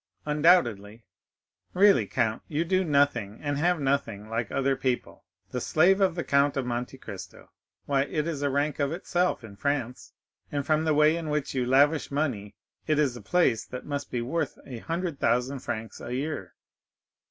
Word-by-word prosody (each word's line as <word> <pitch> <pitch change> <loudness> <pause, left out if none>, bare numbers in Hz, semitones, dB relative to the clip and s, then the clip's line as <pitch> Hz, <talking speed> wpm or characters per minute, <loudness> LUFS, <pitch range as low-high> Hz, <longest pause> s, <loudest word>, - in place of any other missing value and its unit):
"Undoubtedly." 120 - +2 0.7
"Really, 190 - +5
count, 110 +3 0
you 155 +2 -1
do 185 +2 +2
nothing, 140 - +1
and 145 -1 -2
have 175 +1 +2
nothing 135 -7 -1
like 115 0 -3
other 135 0 +1
people. 130 -2 -3 0.3
The 125 - -3
slave 185 - +3
of 185 -3 +3
the 170 - -2
Count 140 +1 +2
of 135 - -1
Monte 125 +2 -3
Cristo! 95 -7 -10 0.3
Why, 140 -1 +1
it 150 +1 -2
is 160 -4 -3
a 145 - +1
rank 145 +2 -1
of 140 0 +1
itself 175 -3 -1
in 100 -3 -11
France, 135 -3 -3 0.4
and 145 -1 -2
from 155 +1 +2
the 155 -2 +2
way 150 +2 +5
in 165 -2 -4
which 150 -2 -1
you 125 -2 -1
lavish 145 +4 +3
money, 125 -9 -2 0.3
it 155 -2 +2
is 140 -5 +2
a 120 - -9
place 115 - +2
that 125 - -8
must 145 -1 -4
be 120 -2 -2
worth 145 +3 -2
a 125 -4 -7
hundred 165 +1 -3
thousand 125 +4 +1
francs 110 -2 -6
a 120 - -7
year." 135 - -4
140 Hz, 180 wpm, -27 LUFS, 120-155 Hz, 0.7 s, Really